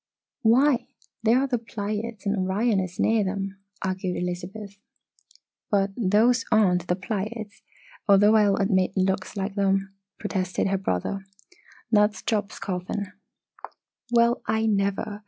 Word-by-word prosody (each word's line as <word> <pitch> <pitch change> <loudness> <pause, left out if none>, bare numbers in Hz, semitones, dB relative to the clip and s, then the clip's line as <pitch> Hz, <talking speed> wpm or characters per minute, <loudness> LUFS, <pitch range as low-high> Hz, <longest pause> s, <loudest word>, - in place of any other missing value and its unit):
"Why 255 +3 +4 0.3
there 225 +2 +4
are 270 - +2
the 250 -3 -1
Pleiades 215 -1 -5
and 200 +1 +1
Orion 200 +3 +1
is 185 -1 -5
near 225 -1 +3
them," 195 0 -4 0.2
argued 185 -1 -2
Elizabeth. 190 +3 -5 0.9
"But 200 -1 +2
those 230 +3 +3
aren't 180 -5 +3
the 180 - +1
Pleiades, 210 +2 -5 0.5
although 205 +2 +6
I'll 205 -2 +4
admit 195 -2 +1
it - - +3
looks 190 +1 -1
like 195 +1 -2
them," 195 -1 0 0.2
protested 190 -2 -1
her 195 -1 0
brother. 190 - -2 0.7
"That's 210 -3 +3
Job's 210 -2 -1
Coffin." 185 +1 -4 1.0
"Well, 235 0 +3
I 220 +1 +1
never! 205 0 0
200 Hz, 130 wpm, -25 LUFS, 190-220 Hz, 1.0 s, although